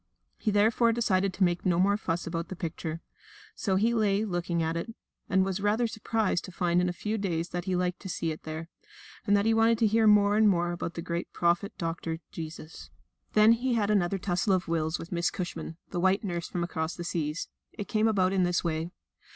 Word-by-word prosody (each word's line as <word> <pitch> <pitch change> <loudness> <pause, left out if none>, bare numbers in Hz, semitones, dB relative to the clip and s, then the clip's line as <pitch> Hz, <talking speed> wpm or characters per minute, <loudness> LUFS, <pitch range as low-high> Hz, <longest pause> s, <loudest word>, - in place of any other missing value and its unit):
He 220 - 0
therefore 220 +3 +3
decided 195 -4 +1
to 195 - +2
make 175 -1 +1
no 180 -2 +2
more 200 +2 +4
fuss 175 -5 -2
about 165 0 -3
the 190 - -6
picture. 165 -1 -5 0.5
So 195 -4 -1
he 225 +5 +2
lay 210 -2 +2
looking 175 -3 -1
at 160 +1 -1
it, 195 +7 -4 0.3
and 190 -1 +3
was 190 0 -2
rather 210 +4 +2
surprised 220 -4 -1
to - - -9
find 175 0 +1
in 180 - +1
a - - 0
few 210 +5 -3
days 170 -4 -2
that 175 0 -4
he 185 -2 0
liked 180 0 -1
to 190 - -8
see 165 -2 -2
it 155 - -7
there, 160 +1 -6 0.6
and 205 0 +5
that 200 - +1
he 225 - +4
wanted 225 +1 +4
to 225 - +3
hear 220 +1 +3
more 205 0 +5
and 215 -1 +6
more 175 -2 +1
about 170 -1 -4
the 170 - -4
great 170 0 -3
Prophet 175 +3 0
Doctor, 165 -1 -3
Jesus. 160 -1 -8 0.4
Then 215 +1 +6
he 240 +2 +1
had 215 -2 +1
another 195 -2 +2
tussle 185 +1 0
of 185 -1 0
wills 160 0 0
with 165 - -9
Miss 175 -1 +1
Cushman, 175 -2 -5
the 175 - -2
white 190 +4 +2
nurse 175 -4 -3
from 175 - -3
across 160 -1 -3
the 175 - -6
seas. 160 -2 -2 0.3
It 205 - -6
came 220 0 +2
about 190 -3 +2
in 190 - +2
this 175 -1 +1
way. 165 0 -2
185 Hz, 225 wpm, -28 LUFS, 170-205 Hz, 0.6 s, and